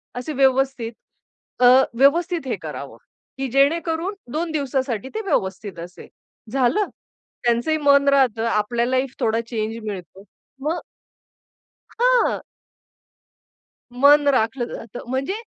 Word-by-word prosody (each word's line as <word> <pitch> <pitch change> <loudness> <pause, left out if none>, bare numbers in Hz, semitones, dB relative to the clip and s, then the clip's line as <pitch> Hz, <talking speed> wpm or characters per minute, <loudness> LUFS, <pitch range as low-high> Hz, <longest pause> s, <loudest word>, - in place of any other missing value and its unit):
असे 250 +5 -4
व्यवस्थित 265 -3 +1 0.7
अ, 250 - +5 0.3
व्यवस्थित 320 +4 +2
हे - - -1
करावं - - -7 0.4
की 270 - -2
जेणेकरून 325 +6 +1 0.2
2 320 +1 -2
दिवसासाठी 265 -5 -2
ते 440 - -1
व्यवस्थित 195 - -2
असेल. 180 +2 -10 0.4
झालं? 270 - +2 0.6
त्यांचंही 240 +7 +1
मन 280 -1 +4
राहतं 255 -5 +3
आपल्याही 235 +4 0
फ 260 - -21
थोडा 225 0 +1
चेंज 225 -1 -4
मिळतो. 190 -1 -7 0.4
मग 315 +5 -1 1.2
हां. - - +3 1.5
मन 285 +3 +5
राखलं 240 -1 +1
जातं 235 +2 -9
म्हणजे 265 +8 -1
265 Hz, 110 wpm, -22 LUFS, 230-295 Hz, 1.5 s, अ